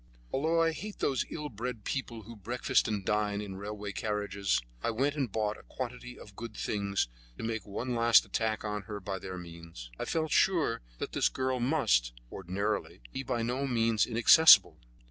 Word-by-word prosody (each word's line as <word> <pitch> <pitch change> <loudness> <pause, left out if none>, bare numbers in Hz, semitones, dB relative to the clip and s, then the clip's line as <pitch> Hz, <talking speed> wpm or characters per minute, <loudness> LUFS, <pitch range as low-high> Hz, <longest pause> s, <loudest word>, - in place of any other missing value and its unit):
Although 160 +4 +2
I 165 - +3
hate 205 +6 -7
those 135 -3 0
ill 150 -2 -5
bred 115 -1 -5
people 120 -5 -4
who 115 +3 -10
breakfast 120 +4 0
and 105 -3 -2
dine 105 -1 0
in 100 -2 -6
railway 105 0 -5
carriages, 105 -2 -1 0.2
I - - 0
went 135 +6 +1
and 135 -7 -1
bought 105 0 -1
a - - -16
quantity 125 0 -6
of 105 - -13
good 115 0 -8
things 100 - -1 0.3
to - - -7
make 110 -3 -3
one 120 +5 -3
last 115 -1 +5
attack 110 -1 -1
on 105 0 -2
her 105 -1 -4
by 95 0 -4
their 95 0 -6
means. 85 -8 -10
I - - -2
felt 160 -1 -1
sure 165 -11 +2 0.2
that - - -4
this - - +2
girl 130 -1 -1
must, 120 - +2 0.2
ordinarily, 95 - -3
be - - -3
by 120 -3 -2
no 130 +4 -1
means 115 -3 +2
inaccessible. 120 +7 +7
110 Hz, 185 wpm, -30 LUFS, 100-125 Hz, 0.3 s, inaccessible